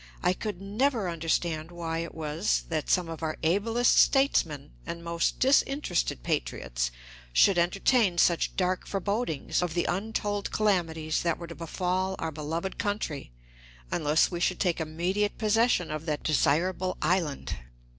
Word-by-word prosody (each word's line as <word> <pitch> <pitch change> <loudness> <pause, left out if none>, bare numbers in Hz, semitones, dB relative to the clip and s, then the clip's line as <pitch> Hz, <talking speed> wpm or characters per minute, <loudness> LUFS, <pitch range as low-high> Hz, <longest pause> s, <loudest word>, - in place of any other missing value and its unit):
I 180 - +3
could 205 -1 -5
never 215 +2 0
understand 165 -1 -1
why 165 -1 -4
it 170 - -5
was 160 +4 0
that 155 -3 -2
some 180 -2 +3
of 165 -1 -7
our 155 -1 -2
ablest 225 +8 +3
statesmen 160 - +3
and 170 0 -6
most 170 0 0
disinterested 270 - +2
patriots - - -1 0.4
should 185 - +5
entertain 195 +2 +2
such 170 -1 +3
dark 185 0 0
forebodings 200 - -1
of 175 -2 -2
the 175 - +1
untold 205 +1 -2
calamities 165 -7 0
that 170 -2 0
were 170 - -7
to 170 - -8
befall 185 +3 -2
our 160 - -3
beloved 160 +5 -4
country 205 - -3 0.6
unless 155 +1 +2
we 175 - -3
should 180 +1 0
take 175 -4 +1
immediate 180 +6 -1
possession 220 -5 +2
of 155 +2 -5
that 150 -2 -2
desirable 180 +5 +1
island. 165 -3 0
175 Hz, 145 wpm, -28 LUFS, 160-200 Hz, 0.6 s, should